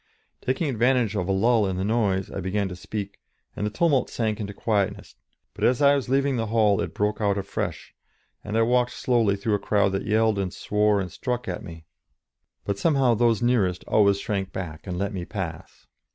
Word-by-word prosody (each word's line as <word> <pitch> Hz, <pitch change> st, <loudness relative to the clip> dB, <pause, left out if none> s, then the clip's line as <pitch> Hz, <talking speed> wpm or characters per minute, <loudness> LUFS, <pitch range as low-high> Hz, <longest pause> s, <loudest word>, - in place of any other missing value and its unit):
Taking 130 Hz, +5 st, -1 dB
advantage 120 Hz, -3 st, +1 dB
of 90 Hz, -3 st, -1 dB
a -, -, 0 dB
lull 110 Hz, +2 st, +3 dB
in 95 Hz, -1 st, -2 dB
the 95 Hz, -, -1 dB
noise, 100 Hz, -3 st, 0 dB
I -, -, -4 dB
began 95 Hz, +2 st, -1 dB
to 90 Hz, -, -6 dB
speak, 100 Hz, +2 st, -6 dB, 0.4 s
and 105 Hz, -, -2 dB
the -, -, -1 dB
tumult 140 Hz, +3 st, +1 dB
sank 110 Hz, -2 st, -2 dB
into 100 Hz, -2 st, -4 dB
quietness; 100 Hz, -1 st, -1 dB, 0.4 s
but -, -, -7 dB
as 125 Hz, +2 st, +3 dB
I 140 Hz, -1 st, +6 dB
was 135 Hz, -3 st, -3 dB
leaving 135 Hz, 0 st, +2 dB
the 115 Hz, -1 st, -1 dB
hall 105 Hz, -2 st, +3 dB
it -, -, -5 dB
broke 105 Hz, +1 st, -1 dB
out 100 Hz, -1 st, +1 dB
afresh, 100 Hz, 0 st, -4 dB, 0.5 s
and 105 Hz, +1 st, -2 dB
I 115 Hz, -, +4 dB
walked 125 Hz, +1 st, +2 dB
slowly 115 Hz, -5 st, +1 dB
through 105 Hz, +2 st, -1 dB
a 105 Hz, -, +2 dB
crowd 100 Hz, -1 st, +2 dB
that 95 Hz, +2 st, -3 dB
yelled 110 Hz, -1 st, +2 dB
and 95 Hz, -2 st, -2 dB
swore 105 Hz, +1 st, +1 dB
and 90 Hz, -3 st, -4 dB
struck 125 Hz, -, -3 dB
at 90 Hz, -2 st, -4 dB
me, 85 Hz, -1 st, -10 dB, 0.8 s
but 100 Hz, -1 st, -2 dB
somehow 135 Hz, -6 st, +3 dB
those 115 Hz, -1 st, +2 dB
nearest 100 Hz, -7 st, +1 dB
always 100 Hz, -2 st, +3 dB
shrank 100 Hz, -2 st, -3 dB
back 90 Hz, -3 st, -7 dB
and 90 Hz, -1 st, -3 dB
let 100 Hz, +2 st, -2 dB
me 90 Hz, -2 st, -4 dB
pass. 85 Hz, -3 st, -7 dB
105 Hz, 205 wpm, -25 LUFS, 95-120 Hz, 0.8 s, I